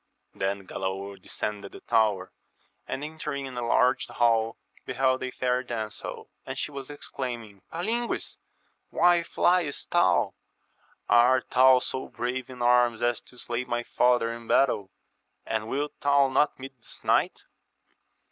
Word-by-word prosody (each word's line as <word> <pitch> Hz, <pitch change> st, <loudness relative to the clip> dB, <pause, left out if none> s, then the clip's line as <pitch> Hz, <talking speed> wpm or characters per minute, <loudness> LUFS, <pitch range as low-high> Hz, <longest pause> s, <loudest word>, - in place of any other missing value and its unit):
Then 95 Hz, 0 st, -2 dB
Galaor 95 Hz, +1 st, -5 dB
descended 100 Hz, -2 st, -5 dB
the -, -, -9 dB
tower, 105 Hz, -5 st, +1 dB, 0.6 s
and 140 Hz, -, -4 dB
entering 150 Hz, -2 st, -4 dB
a 120 Hz, -, -3 dB
large 125 Hz, +2 st, +3 dB
hall 115 Hz, -1 st, +2 dB, 0.3 s
beheld 130 Hz, 0 st, +1 dB
a 130 Hz, -, -2 dB
fair 125 Hz, 0 st, 0 dB
damsel, 115 Hz, -4 st, -5 dB, 0.2 s
and -, -, -6 dB
she -, -, -3 dB
was 140 Hz, -1 st, -7 dB
exclaiming, 120 Hz, -8 st, -6 dB
Palingues! 225 Hz, +8 st, -2 dB, 0.5 s
why 175 Hz, -1 st, +4 dB
flyest 170 Hz, -3 st, +1 dB
thou? -, -, +3 dB, 0.7 s
art 125 Hz, +2 st, +4 dB
thou 130 Hz, 0 st, +7 dB
so 130 Hz, +1 st, -3 dB
brave 125 Hz, +1 st, -4 dB
in 125 Hz, -2 st, -6 dB
arms 120 Hz, -1 st, +3 dB
as 120 Hz, 0 st, +1 dB
to 125 Hz, -, -17 dB
slay 120 Hz, 0 st, -3 dB
my 120 Hz, -1 st, -2 dB
father 120 Hz, -1 st, +2 dB
in 115 Hz, 0 st, -10 dB
battle, 105 Hz, -8 st, +2 dB, 0.6 s
and 110 Hz, -1 st, -2 dB
wilt 145 Hz, +5 st, -2 dB
thou 140 Hz, -1 st, +4 dB
not 145 Hz, +2 st, +2 dB
meet 135 Hz, +1 st, -8 dB
this -, -, -14 dB
knight? -, -, +1 dB
125 Hz, 140 wpm, -27 LUFS, 115-135 Hz, 0.7 s, thou